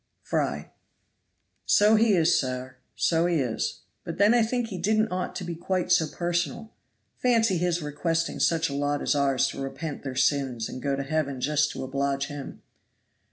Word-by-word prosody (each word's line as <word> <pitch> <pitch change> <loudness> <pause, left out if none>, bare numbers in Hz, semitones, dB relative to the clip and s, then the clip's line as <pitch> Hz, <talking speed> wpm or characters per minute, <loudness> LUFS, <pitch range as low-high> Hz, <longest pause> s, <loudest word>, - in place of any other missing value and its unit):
Fry. - - -2 1.0
So 210 +1 +5
he 220 -2 +4
is, 170 -1 +4
sir. 130 -1 -4 0.2
So 165 +10 +2
he 175 - +1
is. 125 -7 -2 0.2
But - - -6
then 205 +3 +5
I 240 - +4
think 230 +1 -1
he 190 -4 -5
didn't 215 +4 +1
ought 180 0 -3
to 185 - -4
be 175 -1 -4
quite 180 +2 -2
so 175 -3 +4
personal. 175 +4 -2 0.5
Fancy 230 -7 +2
his 175 -1 0
requesting 165 +3 -1
such 165 -1 +2
a 140 - -5
lot 145 +1 -1
as - - +2
ours 140 -2 +2
to - - -6
repent 145 +2 -5
their 135 -2 -5
sins 135 -4 +1
and 130 - -7
go 140 +1 0
to 140 - -3
heaven 140 -2 -2
just 150 +3 +1
to - - -5
oblige 140 +1 -1
him. 145 -2 -8
160 Hz, 180 wpm, -26 LUFS, 140-180 Hz, 1.0 s, So